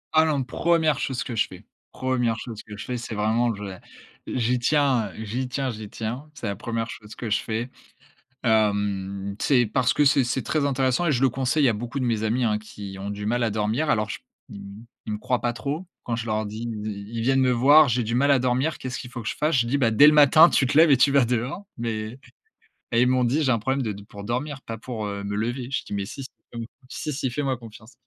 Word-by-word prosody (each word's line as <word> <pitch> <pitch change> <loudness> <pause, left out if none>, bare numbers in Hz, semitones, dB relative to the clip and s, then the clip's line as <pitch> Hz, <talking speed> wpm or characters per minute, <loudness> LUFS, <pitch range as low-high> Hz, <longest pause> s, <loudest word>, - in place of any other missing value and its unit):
Ah 160 0 +6
non, 145 -4 +1
1re 160 +3 +1
chose 130 -3 -2
que 120 - -5
je 105 - +2
fais. 90 +2 -12 0.3
1re 125 -3 0
chose 115 -4 -7
que 105 -1 -10
je - - -7
fais. 125 -1 -3
C'est 115 -1 -6
vraiment, 110 +3 +1
j'ai 100 -2 -7 0.5
j'y 125 0 0
tiens, 130 -5 +2
heu, 110 - -7
j'y 125 +5 -3
tiens, 135 0 -2
j'y 110 -2 -8
tiens. 120 +9 -5
C'est 120 - -7
la 100 - -2
1re 115 +2 -3
chose 105 -1 -10
que 115 - -5
je 105 - +3
fais. 115 +3 -3 0.7
Hem, 100 -3 0
c'est 125 -4 +4
parce 125 +2 +1
que 145 - +3
c'est 135 -1 +4
c'est 125 +2 -1
très 155 -2 0
intéressant 135 +3 +1
et 155 - +3
je 125 -1 0
le 135 - +5
conseille 135 +3 +1
à 120 - +3
beaucoup 120 +5 -4
de 130 - 0
mes 115 -2 0
amis 120 +3 +1
hein, 105 -1 +1
qui 100 -2 -9
ont 100 +1 -5
du 105 0 -5
mal 120 +3 +1
à 115 - +2
dormir. 110 +8 -1
Alors 105 -5 +1
je - - -5
p - - -41 0.3
ils 100 +3 -10 0.2
ils 110 - -4
me - - -2
croient 125 +3 -1
pas 120 - +1
trop 140 +10 -4 0.2
quand 115 - -2
je 115 0 -4
leur 110 -1 -1
dis. 110 +2 -6
Ils 105 -1 -6
ils 115 - -1
viennent 135 +2 +3
me 130 -1 +3
voir, 140 +5 +6
j'ai 120 0 +1
du 115 +2 -2
mal 140 +3 +3
à 135 - +5
dormir. 130 +5 0
Qu'est-ce 130 -1 -5
qu'il 125 - -8
faut 120 -1 -6
que 110 - -7
je - - -2
fasse? 150 +1 +1
Je 120 - +2
dis: 135 +4 +1
«Bah 120 -5 +2
dès 145 +7 +7
le 150 - +7
matin, 150 +3 +7
tu 135 - +2
te 130 - +1
lèves 160 -1 +7
et 135 - +6
tu 135 +2 +4
vas 140 -3 +4
dehors». 125 - -2
Mais 115 +1 -4 0.7
mais 115 - +3
ils 125 - +4
m'ont 130 0 +3
dit: 140 +7 +1
«J'ai 130 - +2
un 115 - +2
problème 130 +4 -1
de 110 - -2
de 100 0 -9
pour 100 0 -11
dormir, 130 +5 -3
pas 115 - -6
pour, 115 -2 -5
heu, 100 -1 -4
me 100 0 -3
lever». 120 +4 -2
Je 135 - -1
dis: - - -7
«Mais 100 -1 -2
si, 135 - -7
si, - - -9 0.2
hem, 115 - -5 0.3
si, 150 - -4
si, - - -3
si 135 -1 -2
fais-moi 135 +1 -1
confiance». 115 0 -13
120 Hz, 265 wpm, -24 LUFS, 110-135 Hz, 0.7 s, dès